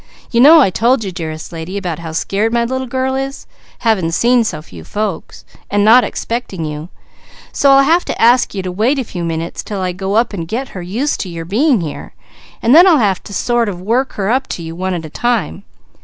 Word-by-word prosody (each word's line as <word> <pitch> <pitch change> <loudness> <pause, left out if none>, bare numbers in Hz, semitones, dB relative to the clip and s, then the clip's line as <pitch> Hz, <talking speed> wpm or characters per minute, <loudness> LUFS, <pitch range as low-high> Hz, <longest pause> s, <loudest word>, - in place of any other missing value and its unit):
"You 235 - +3
know 310 +4 +8
I 195 - +3
told 235 +4 +2
you 195 - -4
dearest 160 -3 -6
lady, 165 +4 -6
about 175 -5 -4
how 165 -1 -7
scared 200 +7 -1
my 235 0 +1
little 260 +2 -3
girl 260 +1 -1
is, 270 +1 -4 0.4
having 215 -8 +1
seen 240 +7 +3
so 175 -8 -3
few 85 - -12
folks 205 - -5 0.2
and 205 0 +2
not 240 +3 +7
expecting 230 -8 -4
you; 150 +2 -6 0.6
so 280 - +2
I'll 275 0 +6
have 330 +5 +3
to - - -4
ask 235 -1 +3
you 190 - -3
to 185 - -4
wait 225 +10 +1
a 265 - -1
few 180 -6 -6
minutes 165 0 -3
'til 205 -2 -6
I 185 -1 -1
go 190 +3 -3
up 230 0 +2
and 170 -4 -5
get 245 +8 -4
her 185 - -8
used 225 +12 -2
to 190 - -4
your 165 -1 -6
being 235 - +2
here 155 -3 -7 0.5
and 235 - +4
then 345 +5 +8
I'll 340 -4 +6
have 200 -7 +1
to - - -10
sort 235 +2 0
of 180 -3 -6
work 235 +8 -1
her 200 +1 -1
up 260 +2 0
to 170 - -5
you 165 0 -7
one 185 +1 -2
at 165 -2 -5
a - - -8
time. 235 -3 -2
210 Hz, 230 wpm, -16 LUFS, 175-250 Hz, 0.6 s, know